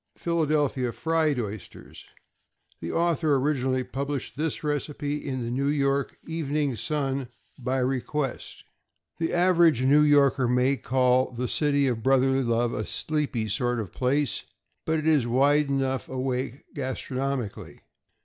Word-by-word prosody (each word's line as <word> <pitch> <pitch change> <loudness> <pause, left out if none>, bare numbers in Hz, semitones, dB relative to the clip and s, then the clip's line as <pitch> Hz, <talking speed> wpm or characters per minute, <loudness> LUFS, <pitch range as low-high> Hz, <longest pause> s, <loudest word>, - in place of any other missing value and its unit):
=Philadelphia 150 -6 0
Fried 160 -1 0
Oysters.= 105 -3 -7 0.7
The 85 - -5
author 165 -3 +2
originally 130 -2 0
published 140 -2 -4
this 155 +3 -2
recipe 145 0 -2
in 130 -3 -3
the 115 0 -3
New 135 +3 0
York 140 -1 0
"Evening 150 -4 -1
Sun" 135 +1 -2 0.3
by 130 +1 -1
request. 130 +1 -2 0.6
The 165 - 0
average 175 -7 +4
New 140 +3 +5
Yorker 140 -3 +4
may 125 +3 +2
call 130 +1 +2
the 125 0 -3
City 145 -1 +2
of 120 -3 -1
Brotherly 135 +1 +3
Love 120 -1 0
a 110 - -2
sleepy 145 -5 -1
sort 120 +3 0
of 105 -5 -4
a - - -33
place, 135 -1 0 0.4
but 160 0 +1
it 155 - -3
is 150 -7 +3
wide 140 +4 +3
enough 135 -1 -1
awake 130 0 -3
gastronomically. 130 -3 -4
135 Hz, 135 wpm, -26 LUFS, 125-150 Hz, 0.7 s, New